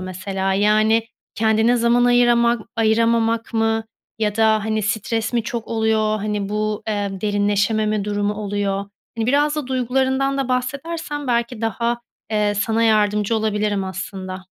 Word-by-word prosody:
mesela? 190 Hz, +1 st, -3 dB
Yani, 215 Hz, +3 st, +3 dB, 0.3 s
kendine 220 Hz, +2 st, +3 dB
zaman 235 Hz, +1 st, +3 dB
ayırama 240 Hz, -1 st, +4 dB, 0.2 s
ayıramamak 230 Hz, +1 st, +1 dB
mı, 225 Hz, 0 st, +1 dB, 0.3 s
ya 210 Hz, -1 st, -1 dB
da, 220 Hz, -1 st, +3 dB
hani, 220 Hz, 0 st, -1 dB
stres 220 Hz, +2 st, -1 dB
mi 235 Hz, -2 st, +1 dB
çok 230 Hz, 0 st, -4 dB
oluyor, 220 Hz, -1 st, +1 dB
hani, 210 Hz, -1 st, -2 dB
bu, 210 Hz, 0 st, -2 dB
eee, 205 Hz, -2 st, -1 dB
derinleşememe 205 Hz, +1 st, +1 dB
durumu 205 Hz, 0 st, -1 dB
oluyor? 200 Hz, -1 st, -2 dB, 0.3 s
Hani, 225 Hz, -1 st, -1 dB
biraz 290 Hz, +3 st, +2 dB
da 295 Hz, -, -3 dB
duygularından 265 Hz, +2 st, 0 dB
da 270 Hz, -2 st, -1 dB
bahsedersen, 290 Hz, +4 st, -3 dB
belki 235 Hz, -1 st, -1 dB
daha, 235 Hz, +2 st, -1 dB, 0.3 s
ee,e 210 Hz, -1 st, +1 dB
sana 220 Hz, +3 st, 0 dB
yardımcı 210 Hz, 0 st, +2 dB
olabilirim 210 Hz, -2 st, 0 dB
aslında. 185 Hz, 0 st, -6 dB
220 Hz, 135 wpm, -21 LUFS, 205-235 Hz, 0.3 s, ayırama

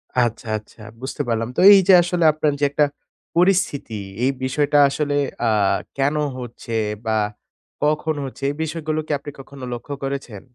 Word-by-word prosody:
আচ্ছা, 120 Hz, -2 st, 0 dB
আচ্ছা 110 Hz, +1 st, -15 dB, 0.2 s
বুঝতে 130 Hz, -, -4 dB
পারলাম। 115 Hz, 0 st, -1 dB
তো -, -, +1 dB
এই 200 Hz, -, +8 dB
যে -, -, +9 dB
আসলে 175 Hz, 0 st, -1 dB
আপনার 155 Hz, 0 st, +1 dB
যে -, -, -2 dB
একটা 150 Hz, +1 st, +3 dB, 0.5 s
পরিস্থিতি, 170 Hz, -, +1 dB, 0.2 s
এই 130 Hz, -, +3 dB
বিষয়টা 145 Hz, +3 st, +1 dB
আসলে 145 Hz, +1 st, -1 dB, 0.3 s
আ -, -, +3 dB, 0.5 s
কেন 140 Hz, +2 st, +1 dB, 0.2 s
হচ্ছে 120 Hz, -1 st, -8 dB, 0.3 s
বা 110 Hz, -1 st, +1 dB, 0.7 s
কখন 155 Hz, +1 st, +1 dB
হচ্ছে, 135 Hz, +1 st, -9 dB
এই 145 Hz, -, -3 dB
বিষয়গুলো 155 Hz, -1 st, -3 dB
কি -, -, -4 dB
আপনি 145 Hz, +1 st, -8 dB
কখনো 135 Hz, 0 st, -11 dB
লক্ষ্য 120 Hz, +4 st, -6 dB
করেছেন? 135 Hz, -7 st, -5 dB
140 Hz, 160 wpm, -21 LUFS, 125-155 Hz, 0.7 s, যে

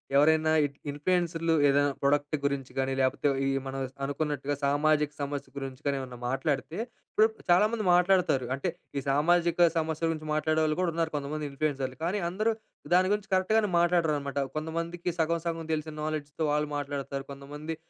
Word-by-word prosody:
ఎవరైనా 155 Hz, +2 st, +5 dB
ఇట్ 140 Hz, 0 st, -6 dB, 0.2 s
ఇన్ఫ్లుయెన్సరులు 165 Hz, +1 st, 0 dB
ఏదైనా 145 Hz, 0 st, +3 dB
ప్రొడక్ట్ 145 Hz, +2 st, +2 dB
గురించి 140 Hz, -2 st, -1 dB
గానీ 135 Hz, 0 st, 0 dB
లేకపోతే 130 Hz, +2 st, +1 dB, 0.2 s
ఈ -, -, +1 dB, 0.2 s
మన 135 Hz, -, -5 dB, 0.2 s
స్ -, -, -37 dB
అనుకున్నట్టుగా 145 Hz, 0 st, -1 dB
సామాజిక 150 Hz, +1 st, +2 dB
సమస్య 140 Hz, -1 st, -4 dB
గురించి 135 Hz, -2 st, -6 dB
కానీ 140 Hz, -1 st, +1 dB
ఏవన్నా 125 Hz, -2 st, -7 dB
మాట్లాడితే 135 Hz, +4 st, -1 dB, 0.4 s
ఇప్పుడిప్పుడు 220 Hz, +1 st, +2 dB
చాలా 185 Hz, +4 st, +6 dB
మంది 225 Hz, -2 st, -2 dB
మాట్లాడుతారు. 180 Hz, -7 st, +3 dB
అంటే 155 Hz, +6 st, -2 dB, 0.3 s
ఈ -, -, +2 dB
సామాజిక 170 Hz, +4 st, +4 dB
సమస్యల 160 Hz, 0 st, 0 dB
గురించి 155 Hz, -1 st, -5 dB
మాట్లాడేవాళ్ళు 155 Hz, 0 st, +1 dB
కూడా 180 Hz, -, +2 dB
ఉన్నారు 165 Hz, -1 st, -1 dB
కొంతమంది 150 Hz, +1 st, -3 dB
ఇన్ఫ్లుయెన్సరులు. 135 Hz, -3 st, -2 dB
కానీ 195 Hz, +4 st, 0 dB
అందరూ 215 Hz, +5 st, +1 dB, 0.4 s
దాని 185 Hz, +2 st, +4 dB
గురించి 210 Hz, 0 st, -3 dB
కరెక్ట్‌గానే 210 Hz, +3 st, +3 dB
మాట్లాడరనమాట. 155 Hz, -5 st, +1 dB, 0.2 s
కొంతమందికి 165 Hz, +3 st, -3 dB
సగం 165 Hz, +1 st, +1 dB
సగం 165 Hz, -1 st, -2 dB
తెలిసిన 155 Hz, 0 st, -3 dB
నాలెడ్జ్‌తో 155 Hz, 0 st, -3 dB
వాళ్ళు 150 Hz, 0 st, 0 dB
మాట్లాడతారు. 140 Hz, -1 st, -4 dB
కొంతమంది 150 Hz, +3 st, -6 dB
155 Hz, 155 wpm, -29 LUFS, 140-170 Hz, 0.4 s, చాలా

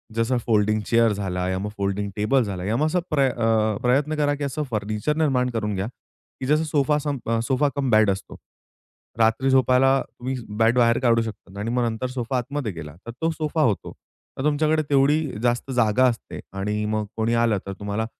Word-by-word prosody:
जसं 115 Hz, +2 st, +1 dB
folding 110 Hz, -1 st, +2 dB
chair 115 Hz, -2 st, +3 dB
झाला 90 Hz, -2 st, -2 dB
या 95 Hz, 0 st, -1 dB
मग 105 Hz, +1 st, -3 dB
फोल्डिंग 100 Hz, +1 st, -1 dB
टेबल 125 Hz, +5 st, +2 dB
झाला. 95 Hz, -4 st, -4 dB
या 110 Hz, +3 st, 0 dB
मग 155 Hz, -, +2 dB
असं 180 Hz, +3 st, +1 dB
प्र 140 Hz, -3 st, +3 dB
अ, 110 Hz, -3 st, +1 dB
प्रयत्न 140 Hz, +5 st, +2 dB
करा, 145 Hz, -1 st, +1 dB
की 145 Hz, -, -5 dB
असं 145 Hz, +2 st, -3 dB
फर्निचर 105 Hz, +7 st, -1 dB
निर्माण 130 Hz, -5 st, +2 dB
करून 105 Hz, -3 st, -2 dB
घ्या, 95 Hz, +3 st, -2 dB
की 130 Hz, +1 st, -13 dB
जसं 155 Hz, +2 st, +3 dB
सोफा 150 Hz, -1 st, +1 dB
सम 145 Hz, -2 st, -3 dB, 0.3 s
सोफा 140 Hz, +2 st, +2 dB
कम 140 Hz, -2 st, -1 dB
बेड 110 Hz, -1 st, +5 dB
असतो. 95 Hz, -, -6 dB, 0.8 s
रात्री 115 Hz, +4 st, +3 dB
झोपायला 130 Hz, 0 st, +4 dB
तुम्ही 130 Hz, +2 st, -5 dB, 0.2 s
बेड 115 Hz, +2 st, +3 dB
बाहेर 115 Hz, -1 st, +4 dB
काढू 115 Hz, -2 st, +3 dB
शकतात 100 Hz, -3 st, -8 dB
आणि 110 Hz, +3 st, -3 dB
मग 125 Hz, 0 st, +1 dB
नंतर 115 Hz, +2 st, -2 dB
सोफा 125 Hz, 0 st, -3 dB
आतमध्ये 125 Hz, -1 st, -3 dB
गेला 75 Hz, -2 st, -9 dB
तर -, -, -4 dB
तो 165 Hz, -, +2 dB
सोफा 155 Hz, 0 st, -2 dB
होतो. 115 Hz, -9 st, 0 dB, 0.5 s
तर 130 Hz, -, -3 dB
तुमच्याकडे 155 Hz, +1 st, +2 dB
तेवढी 145 Hz, +2 st, +4 dB, 0.2 s
जास्त 120 Hz, +2 st, 0 dB
जागा 120 Hz, 0 st, +3 dB
असते 115 Hz, -2 st, -4 dB, 0.2 s
आणि 105 Hz, +1 st, -1 dB
मग 110 Hz, 0 st, -1 dB
कोणी 110 Hz, +1 st, +1 dB
आलं 110 Hz, -3 st, +2 dB
तर 100 Hz, -, -4 dB
तुम्हाला 105 Hz, +2 st, -2 dB
120 Hz, 195 wpm, -23 LUFS, 105-135 Hz, 0.8 s, बेड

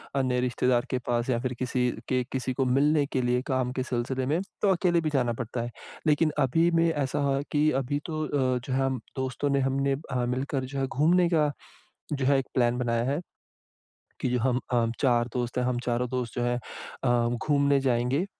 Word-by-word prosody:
अन्य 130 Hz, -2 st, +1 dB
रिश्तेदार 125 Hz, 0 st, +1 dB
के 130 Hz, -, 0 dB
पास 120 Hz, +1 st, 0 dB
या 120 Hz, -2 st, +2 dB
फिर 125 Hz, 0 st, -2 dB
किसी 125 Hz, -1 st, 0 dB, 0.2 s
के 130 Hz, -1 st, +2 dB
किसी 130 Hz, -1 st, -2 dB
को 135 Hz, 0 st, 0 dB
मिलने 145 Hz, +3 st, +3 dB
के 130 Hz, -2 st, -1 dB
लिए 125 Hz, 0 st, +1 dB
काम 130 Hz, -2 st, 0 dB
के 130 Hz, 0 st, -2 dB
सिलसिले 130 Hz, +1 st, -2 dB
में, 155 Hz, +6 st, +1 dB, 0.2 s
तो 205 Hz, -, +3 dB
अकेले 175 Hz, -2 st, +2 dB
भी 155 Hz, -, 0 dB
जाना 125 Hz, -4 st, +2 dB
पड़ता 120 Hz, 0 st, -4 dB
है। 120 Hz, -, -3 dB, 0.4 s
लेकिन 155 Hz, +1 st, +3 dB
अभी 160 Hz, +6 st, +3 dB
में 165 Hz, 0 st, +3 dB
ऐसा 145 Hz, -2 st, -1 dB, 0.2 s
है 140 Hz, -, -1 dB
कि 150 Hz, +1 st, +3 dB
अभी 145 Hz, +3 st, -2 dB
तो 155 Hz, -2 st, -3 dB
अ, 130 Hz, -4 st, +1 dB
जो 130 Hz, -, -2 dB
है 135 Hz, 0 st, +2 dB, 0.3 s
दोस्तों 130 Hz, +2 st, -2 dB
ने 140 Hz, 0 st, +2 dB
हमने 135 Hz, +1 st, +1 dB, 0.2 s
अ, 125 Hz, -1 st, 0 dB
मिलकर 130 Hz, +2 st, -2 dB
जो 135 Hz, +1 st, -5 dB
है 135 Hz, -, 0 dB
घूमने 170 Hz, +6 st, +3 dB
का 155 Hz, -4 st, +2 dB, 0.6 s
जो 140 Hz, -2 st, 0 dB
है 140 Hz, 0 st, +4 dB
एक 135 Hz, -, -2 dB
प्लान 120 Hz, -1 st, +2 dB
बनाया 115 Hz, -1 st, 0 dB
है, 140 Hz, +5 st, 0 dB, 1.0 s
कि -, -, 0 dB
जो 125 Hz, 0 st, +1 dB
हम 125 Hz, +1 st, +1 dB
अ, 120 Hz, -1 st, +3 dB
4 120 Hz, -3 st, +3 dB
दोस्त 120 Hz, -1 st, -2 dB
हैं 125 Hz, -, +1 dB
हम 125 Hz, -1 st, 0 dB
चारों 125 Hz, +1 st, 0 dB
दोस्त 125 Hz, -3 st, -3 dB
जो 120 Hz, -, -1 dB
हैं 120 Hz, 0 st, 0 dB, 0.4 s
अ, 120 Hz, -2 st, +3 dB, 0.2 s
घूमने 140 Hz, -1 st, +3 dB
जाएँगे। 125 Hz, +5 st, +1 dB
130 Hz, 210 wpm, -27 LUFS, 125-140 Hz, 1.0 s, है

